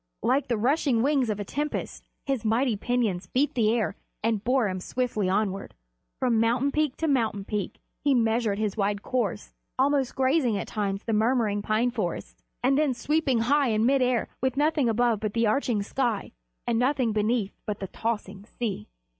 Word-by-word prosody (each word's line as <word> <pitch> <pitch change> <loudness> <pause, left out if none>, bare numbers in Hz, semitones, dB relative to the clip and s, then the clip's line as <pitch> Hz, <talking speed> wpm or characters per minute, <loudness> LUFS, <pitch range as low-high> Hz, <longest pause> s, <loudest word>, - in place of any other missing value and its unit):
Like 265 +3 +2
the 235 -3 0
rushing 250 0 +2
wings 275 -4 +2
of 210 -1 -2
a 205 - -3
tempest, 295 +8 -3 0.2
his 270 -5 -1
mighty 230 +2 +2
pinions 210 -5 -1
beat 270 +9 +1
the 220 -3 +2
air 220 -4 0 0.3
and 220 -2 0
bore 250 -2 +2
him 185 -1 -3
swiftly 215 -2 -1
onward. 195 0 -1 0.4
From 240 -3 +2
mountain 240 +5 +2
peak 305 -3 0
to 325 - -1
mountain 225 -8 0
peak 210 -3 -3 0.2
he 285 -2 +3
measured 225 -3 +1
his 210 -2 -1
wide 205 -1 -1
course, 225 -6 -2 0.2
almost 270 -1 +1
grazing 260 -4 +2
at - - -3
times 200 -2 -2
the 225 - -2
murmuring 215 -2 +2
pine 220 +4 +1
forests, - - -4 0.2
and 270 +3 +3
then 290 -5 +2
sweeping 285 -4 +1
high 280 +4 +3
in 220 -1 +2
mid 270 +1 +3
air 250 -2 +1
with 260 0 0
nothing 295 -4 +2
above 230 -1 +2
but 215 0 -3
the 230 0 +3
arching 220 -2 +1
sky, 235 -1 -1 0.3
and 230 -1 +1
nothing 255 -2 +2
beneath 215 -1 0
but 210 -1 -3
the 195 - -4
tossing 205 -1 -4
sea. 210 - -4
235 Hz, 180 wpm, -26 LUFS, 210-260 Hz, 0.4 s, he